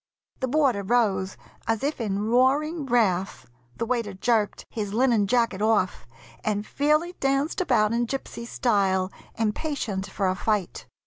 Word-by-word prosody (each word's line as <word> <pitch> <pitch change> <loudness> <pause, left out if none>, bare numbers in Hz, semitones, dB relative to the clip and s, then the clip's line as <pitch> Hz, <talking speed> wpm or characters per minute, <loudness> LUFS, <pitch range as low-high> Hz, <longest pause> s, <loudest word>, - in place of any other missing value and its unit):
The 260 - -1
boarder 265 -6 +2
rose 195 -3 +1 0.3
as 225 +1 0
if 285 -2 -1
in 200 -3 -1
roaring 275 +6 +2
wrath, 200 -7 +1 0.3
The 230 - -1
waiter 230 -5 -2
jerked 215 +1 0
his 210 -2 -4
linen 235 -4 +3
jacket 230 -4 +1
off 210 - +1 0.4
And 210 -1 -1
fairly 305 +7 +1
danced 275 +5 +1
about 215 -11 +2
in 235 0 0
gypsy 235 -2 -5
style, 195 -6 +1 0.2
Impatient 220 -3 -2
for 195 0 -1
a 185 - +2
fight. 205 0 -2
225 Hz, 140 wpm, -25 LUFS, 200-260 Hz, 0.4 s, linen